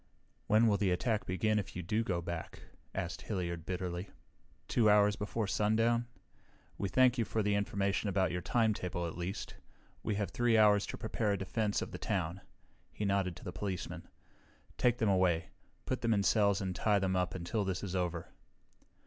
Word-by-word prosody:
"When 110 +2 +5
will 105 -3 +4
the 100 -2 +1
attack 105 +5 0
begin 105 +4 +1
if 100 - -6
you 90 - -4
do 105 +7 0
go 90 -5 -1
back?" 85 -2 -6 0.3
asked 85 0 -3
Hilliard 85 -5 -3
bitterly. 90 0 -3 0.6
"Two 110 -3 +3
hours 105 0 +5
before 105 +2 -2
sundown? 115 +4 +2 0.7
We 100 - -2
thank 125 +3 +4
you - - +3
for 110 0 -1
the 105 0 +1
information 100 0 0
about 95 -1 +1
your 90 +1 -2
timetable, 100 -5 0
at 85 - -5
least. 90 +3 -4 0.5
We 105 - -1
have 100 -3 -2
3 120 +1 +3
hours 105 -2 +5
to - - -5
prepare 110 -1 -1
a - - 0
defense 105 +2 -1
of - - -8
the - - -6
town." 85 +4 -2 0.5
He 105 - -4
nodded 100 -3 +1
to - - -12
the 90 - -6
policeman. 95 -3 -4 0.7
"Take 120 -1 +2
them 110 - +1
away. 90 -4 +2 0.4
Put 130 - -2
them 115 -2 +2
in 100 - +1
cells 100 -1 +3
and 95 -2 -2
tie 105 +2 +2
them 95 -1 0
up 90 0 0
until 90 +4 -1
this 95 0 -2
is 95 -2 -4
over." 85 -2 -2
100 Hz, 185 wpm, -33 LUFS, 90-110 Hz, 0.7 s, When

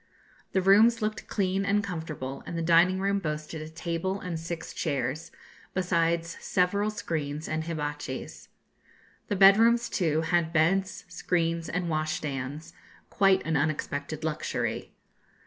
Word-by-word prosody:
The 190 - +2
rooms 220 +4 +5
looked 215 0 -3
clean 195 -1 0
and 205 +1 +1
comfortable, 160 -8 -5
and 170 - -4
the 165 - -1
dining 175 +3 +4
room 200 +1 +1
boasted 155 -2 -4
a 155 - -7
table 170 +4 -3
and 180 -4 -4
six 165 0 -6
chairs, 150 0 -2 0.5
besides 170 -2 0
several 200 +3 +1
screens 155 -7 -3
and 160 0 -2
hibatchis. 150 -4 -5 0.8
The 205 - -1
bedrooms, 225 +5 +6
too, 160 -4 +1
had 165 0 +1
beds, 185 +4 +1
screens, 165 -2 -1
and 180 0 -2
washstands; 155 -1 -3 0.4
quite 195 -1 +3
an 165 0 0
unexpected 150 0 -2
luxury. 155 -1 -2
165 Hz, 130 wpm, -28 LUFS, 155-190 Hz, 0.8 s, bedrooms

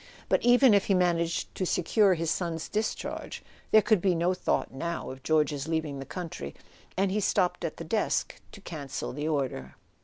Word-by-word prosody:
But - - +3
even 245 0 +6
if 200 -1 +4
he 195 - +2
managed 170 -2 0
to - - -3
secure 185 +2 +3
his 165 -1 -1
son's 165 -3 -2
discharge, 215 +1 -3 0.3
there 215 -1 +6
could 215 -6 +3
be 185 -2 +2
no 170 +2 +2
thought, 180 - -1
now, 170 +3 -4
of 130 0 -10
George's 150 -2 +1
leaving 160 -4 -2
the 135 - -7
country; 165 - -6 0.4
and 195 0 +2
he 210 - +1
stopped 190 -2 +1
at - - -3
the - - -6
desk - - -1
to 200 - -11
cancel 145 -10 -5
the 150 +3 -3
order. 130 - -2
170 Hz, 185 wpm, -28 LUFS, 150-195 Hz, 0.4 s, even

